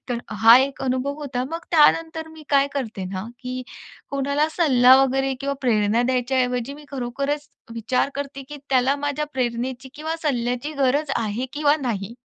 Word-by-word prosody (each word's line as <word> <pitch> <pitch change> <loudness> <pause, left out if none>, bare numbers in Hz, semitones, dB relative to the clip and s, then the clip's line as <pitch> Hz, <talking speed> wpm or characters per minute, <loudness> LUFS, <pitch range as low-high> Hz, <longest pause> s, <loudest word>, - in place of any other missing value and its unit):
तर 245 -2 -1 0.2
हा 230 +2 +10
एक 270 +1 -1
अनुभव 260 +2 -1
होता. 255 -3 -3
मग 330 +1 -5
त्यानंतर 320 0 +3
मी 320 -1 -13
काय 280 -1 +4
करते 220 -8 -4
ना, 185 +1 -5
की 255 -1 -5 0.5
कोणाला 280 +2 0
सल्ला 260 -6 +5
वगैरे 270 0 0
किंवा 280 0 -2
प्रेरणा 225 -2 +2
द्यायच्या 255 +1 0
ऐवजी 250 +2 -2
मी 295 0 -13
खरोखरच 275 +3 -3 0.3
विचार 250 +4 0
करते, 275 -1 -5
की 295 - -7
त्याला 260 +2 +3
माझ्या 290 +1 -2
प्रेरणेची 255 +1 -3
किंवा 315 +2 -4
सल्ल्याची 250 0 -1
गरज 280 +3 +1
आहे 225 +3 -2
किंवा 295 0 +2
नाही. 215 -3 -3
265 Hz, 160 wpm, -23 LUFS, 245-290 Hz, 0.5 s, हा